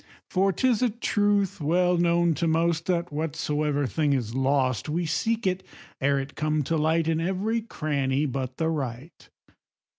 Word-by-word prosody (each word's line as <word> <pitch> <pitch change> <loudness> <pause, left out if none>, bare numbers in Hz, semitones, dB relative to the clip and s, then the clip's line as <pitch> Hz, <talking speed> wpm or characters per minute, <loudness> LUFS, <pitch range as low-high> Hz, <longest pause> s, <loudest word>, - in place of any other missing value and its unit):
For 195 +1 +3
'tis 240 +5 +1
a 250 - +3
truth 205 -4 0
well 180 +4 +2
known 170 -1 +3
to 165 +3 -1
most, 165 0 +1
That 175 -3 -1
whatsoever 150 -1 -1
thing 145 +4 +1
is 120 -4 -2
lost, 130 -3 +1
We 170 +3 -1
seek 220 +9 -1
it, 185 0 0 0.4
ere 140 +1 +2
it 135 +1 -4
come 155 -1 0
to 165 - -1
light, 160 +1 +1
In 165 0 +1
every 195 +6 -1
cranny 145 -8 -1
but 130 -2 -4
the 160 0 0
right. 140 -1 -5
160 Hz, 160 wpm, -26 LUFS, 140-180 Hz, 0.4 s, For